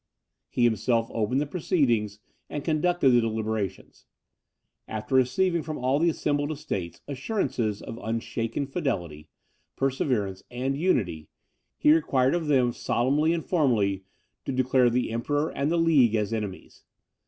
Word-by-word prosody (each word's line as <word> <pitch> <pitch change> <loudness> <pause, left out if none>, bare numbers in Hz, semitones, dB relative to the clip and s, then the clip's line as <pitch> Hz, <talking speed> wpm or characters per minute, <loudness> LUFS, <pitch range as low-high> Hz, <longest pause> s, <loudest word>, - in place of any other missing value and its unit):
He 120 - 0
himself 115 0 +1
opened 115 +5 0
the - - 0
proceedings, 125 - 0 0.3
and 145 - -4
conducted 160 -2 +2
the 120 -1 +5
deliberations. 110 -3 -3 0.8
After 110 +5 -5
receiving 160 +8 +2
from 155 -1 -5
all 130 +3 +1
the 170 +2 +3
assembled 145 -2 -1
estates 100 - -5
assurances 130 - -2
of 115 - -7
unshaken 115 +3 -2
fidelity, 85 - -3 0.5
perseverance, 125 -8 -1
and 130 +3 -2
unity, 100 - 0 0.5
he 150 - +5
required 135 -5 +2
of 170 -3 -1
them 130 -4 +3
solemnly 145 +6 +1
and 170 -2 -2
formally 110 - +1 0.4
to - - -2
declare 130 -1 +3
the 125 0 0
Emperor 145 +7 -1
and 140 +3 -1
the 170 - +2
league 145 -9 +4
as 105 0 -1
enemies. 105 -4 -6
130 Hz, 135 wpm, -26 LUFS, 110-150 Hz, 0.8 s, the